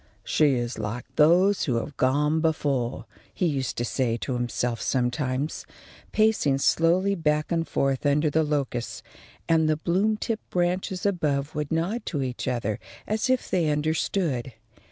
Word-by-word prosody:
"She 145 -4 +3
is 120 -1 -3
like 110 +3 -4
those 180 +6 +4
who 130 -7 0
have 125 +5 -3
gone 150 +4 +2
before," 140 -6 0 0.3
he 180 - -1
used 135 -6 -1
to 120 - 0
say 120 -1 0
to 130 - -3
himself 120 -1 -2
sometimes, 130 +3 -1 0.5
pacing 215 -11 +3
slowly 175 +7 +3
back 150 -4 0
and 165 -1 0
forth 135 -1 0
under 145 +1 +2
the 160 - +3
locusts; 140 -6 -2 0.4
and 160 -1 +3
the 155 - +2
bloom 190 +7 +1
tipped 225 0 -4
branches 180 +1 -1
above 150 -7 0
would 150 -2 -3
nod 175 +9 -1
to 145 -6 -1
each 125 0 -4
other 115 -4 -1 0.3
as 215 +3 -1
if 255 -1 +1
they 170 -4 +2
understood. 150 -3 -1
150 Hz, 155 wpm, -26 LUFS, 130-170 Hz, 0.5 s, those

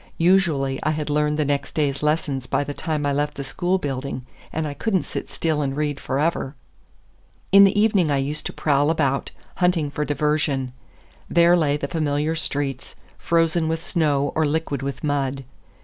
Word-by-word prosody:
Usually 165 -7 +2
I 155 - 0
had 150 -1 -2
learned 150 0 +1
next 145 0 -2
day's 140 -3 0
lessons 150 -4 0
by - - +1
the 145 0 -5
time 150 -1 -2
I 140 - +1
left 145 +1 -1
the 140 - -5
school 175 +8 0
building, 135 -5 -4 0.3
and 160 -1 -2
I 145 - -4
could 220 +7 -1
n't 185 - +1
sit - - -5
still 155 -2 -1
and 135 -1 -2
read 145 -2 -1
forever. 140 0 -1 1.0
In 200 +1 +9
the 200 +1 +2
evening 205 -6 +3
I 140 - +2
used 145 +3 -2
to - - -6
prowl 145 -1 +1
about, 140 -4 0 0.3
hunting 175 -5 +1
for 150 - -2
diversion. 145 -3 0 0.6
There 170 +1 +5
lay 150 -4 +2
the 140 - -3
familiar 150 0 0
streets, 140 -4 -2 0.2
frozen 165 -1 +2
with 160 0 -1
snow 145 -4 0
or 160 - +1
liquid 145 -2 -1
with 140 0 -5
mud. 140 -2 -1
150 Hz, 180 wpm, -23 LUFS, 140-160 Hz, 1.0 s, In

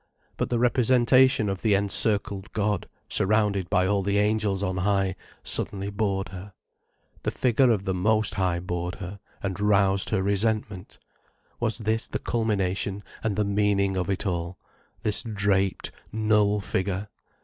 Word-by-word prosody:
But - - -2
the 120 - +1
representation 125 0 +4
of 95 -1 -3
the 105 -3 +3
encircled 100 0 +1
God, 105 -3 -1 0.2
surrounded 100 -2 +1
by 95 -2 +3
all 100 +1 +1
the 100 +1 0
angels 105 -2 +1
on 95 -1 -1
high, 95 0 +1 0.3
suddenly 100 0 -3
bored 100 -2 -1
her. 95 +1 -9 0.7
The - - -1
figure 130 +1 +2
of 105 -4 +1
the 95 - 0
Most 110 +3 +1
High 90 -3 0
bored 90 0 -3
her, 95 +2 -8 0.2
and 95 -1 -3
roused 100 -2 +2
her 95 -3 0
resentment. 100 -1 -1 0.6
Was 115 -2 0
this 110 0 -1
the - - -3
culmination 100 -3 -1 0.2
and 110 -3 -1
the 105 0 +1
meaning 100 -1 +1
of 90 -1 -2
it 95 +1 -1
all, 85 -1 -2 0.5
this 105 - +1
draped, 100 -3 0 0.2
null 105 -1 +2
figure? 100 +1 -2
100 Hz, 150 wpm, -26 LUFS, 95-110 Hz, 0.7 s, representation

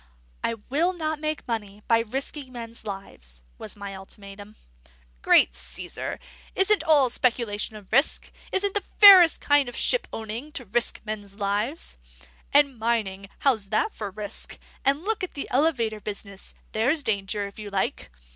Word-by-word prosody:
"I 230 - 0
will 295 - 0
not 315 -3 -3
make 310 -2 -3
money 210 -3 -4
by 230 -1 +4
risking 265 +4 -4
men's 230 -2 -7
lives," 60 - -8 0.2
was - - -9
my 200 -1 -7
ultimatum. 200 +2 -11 0.7
"Great - - +5
Caesar! 175 - -6 0.4
isn't 390 -1 +4
all 290 -6 +5
speculation 230 -4 0
a 210 - -10
risk? 250 +9 +1 0.2
Isn't 395 +1 +1
the 410 - 0 0.2
fairest 380 -5 +9
kind 285 -3 +3
of 245 - -10
shipowning 245 - -1
to 250 - -4
risk 235 +4 -1
men's 205 -2 -6
lives? 205 - -2 0.5
And 280 -4 +4
mining 205 -4 -1
how's 220 -8 +2
that 215 - 0
for 210 -2 -5
risk? 205 +1 -5 0.3
And 280 +4 +1
look 435 0 -1
at 370 - -5
the 280 - -4
elevator 245 -6 +1
business 200 -1 -6 0.2
there's 265 +8 +1
danger, 200 -2 -1
if 200 +2 -10
you 210 -1 -6
like! 190 - -2
230 Hz, 150 wpm, -25 LUFS, 200-290 Hz, 0.7 s, fairest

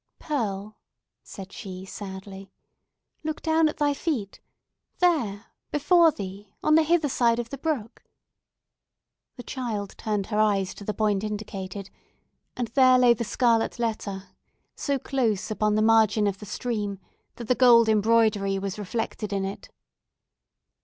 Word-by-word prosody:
"Pearl," 215 -8 -3 0.4
said 195 -1 -10
she 190 -3 -8
sadly, 195 0 -9 0.7
"look 310 0 -3
down 320 -1 +3
at - - -7
thy 290 -1 +2
feet! 275 - -3 0.6
There!—before 305 - +2
thee!—on 200 +6 -3
the 320 - +7
hither 320 -1 +2
side 235 -3 +2
of 235 -1 -4
the 275 - -5
brook!" 270 -8 -3 1.3
The 245 - -9
child 220 -7 -4
turned 210 -3 -1
her 210 - +1
eyes 200 -3 +2
to - - -11
the 210 +1 -3
point 210 -2 +1
indicated, 200 -2 -5 0.7
and 245 -2 -2
there 255 0 +5
lay 245 -1 +6
the 235 - -3
scarlet 230 0 +1
letter 205 -5 -3 0.5
so 280 -2 -1
close 225 -6 -1
upon 210 0 +1
the 215 - +2
margin 220 -1 +4
of 195 -1 -1
the 210 - -10
stream 210 -3 -3 0.4
that 235 - -8
the 250 - +4
gold 240 -2 +6
embroidery 215 -2 +3
was 195 +1 -4
reflected 210 0 -4
in 195 -1 -1
it. 195 - -7
215 Hz, 140 wpm, -26 LUFS, 200-250 Hz, 1.3 s, the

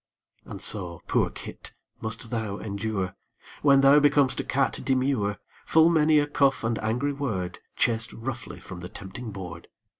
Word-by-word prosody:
And - - -8
so, 90 -6 0
poor - - +2
kit! - - -9 0.3
must 110 +1 -5
thou 110 -4 -2
endure, 100 -2 -3 0.5
When 140 -2 +6
thou 135 +2 +7
becom'st 145 -2 +3
a - - -1
cat 135 +1 0
demure, 130 -7 +1 0.3
Full 160 +1 +6
many 155 -1 +4
a 145 - +4
cuff 140 -3 +2
and 115 0 0
angry 125 +6 0
word, 105 -11 -3 0.2
Chased 115 0 +1
roughly 120 +1 -6
from 90 -1 -9
the 90 +1 -7
tempting 100 +7 -8
board. 90 -4 -8
115 Hz, 155 wpm, -26 LUFS, 100-140 Hz, 0.5 s, thou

